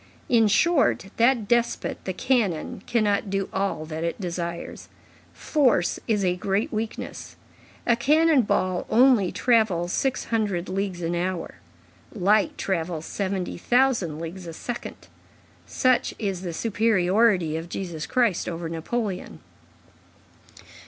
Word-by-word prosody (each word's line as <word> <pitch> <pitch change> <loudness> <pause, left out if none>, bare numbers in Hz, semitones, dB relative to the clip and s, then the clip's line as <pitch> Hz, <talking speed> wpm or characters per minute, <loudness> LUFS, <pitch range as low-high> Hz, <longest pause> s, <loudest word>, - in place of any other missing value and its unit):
In 225 -3 +5
short, 275 - +2
that 235 -2 +3
despot, 240 +1 0
the 190 - -1
cannon, 205 -8 0
cannot 210 -3 +1
do 195 0 -2
all 190 -5 -1
that 160 +1 -5
it 170 +4 -2
desires; 170 -2 -5 0.4
force 255 - +1
is 210 -4 +1
a 180 -1 +1
great 195 +4 -1
weakness. 220 +1 -5 0.5
A 235 - +4
cannon 300 +4 +4
ball 185 -4 0
only 235 -6 +4
travels 215 -8 +2
six 270 -2 0
hundred 205 -6 -1
leagues 190 -2 -3
an 165 +1 -1
hour; 175 0 -3 0.5
light 205 0 +2
travels 165 -3 -2
seventy 190 -3 -3
thousand 240 - +2
leagues 170 +3 -7
a 165 - -6
second. 240 +8 -7 0.6
Such 255 -1 +1
is 195 -4 -3
the 180 -2 -4
superiority 195 -3 +2
of 165 +1 -5
Jesus 170 -4 -5
Christ 235 -8 +1
over 170 -1 -4
Napoleon." 185 +5 -4
195 Hz, 125 wpm, -25 LUFS, 175-230 Hz, 0.6 s, In